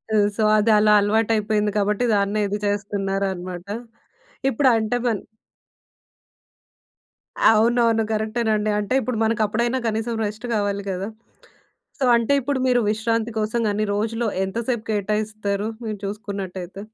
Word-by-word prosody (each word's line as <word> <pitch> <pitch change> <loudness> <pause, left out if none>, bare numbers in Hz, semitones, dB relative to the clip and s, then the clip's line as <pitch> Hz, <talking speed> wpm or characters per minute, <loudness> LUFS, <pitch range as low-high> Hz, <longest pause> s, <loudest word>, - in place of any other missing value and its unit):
అ - - +4 0.2
so, 220 - 0
అదలా 210 0 +4
అలవాటైపోయింది 210 0 +1
కాబట్టి, 210 +3 +1
దాన్నే 200 +1 +1
ఇది 205 +1 -2
చేస్తున్నారనమాట. 195 -3 -2 0.8
ఇప్పుడు 265 +2 +3
అంటే 220 +2 0
మన్ 220 -4 0 2.3
అవునవును. 230 0 +3
కరెక్టేనండి. 215 -1 0
అంటే 210 +5 -2
ఇప్పుడు 250 -3 -2
మనకప్పుడైనా 225 +3 +1
కనీసం 225 +2 -1
రెస్ట్ 215 +4 -5
కావాలి 200 -1 -1
కదా! 190 +2 -3 0.9
సో, 265 - +2
అంటే 235 +4 +2
ఇప్పుడు 275 +1 -1
మీరు 245 -1 +3
విశ్రాంతి 225 +1 0
కోసం 220 +2 -1
గాని, 210 +1 0
రోజులో 225 +2 -1 0.2
ఎంతసేపు 230 +3 -3
కేటాయిస్తారు? 210 0 -1 0.2
మీరు 210 -2 -4
చూసుకున్నట్టయితే. 195 -2 -6
215 Hz, 115 wpm, -22 LUFS, 205-230 Hz, 2.3 s, అ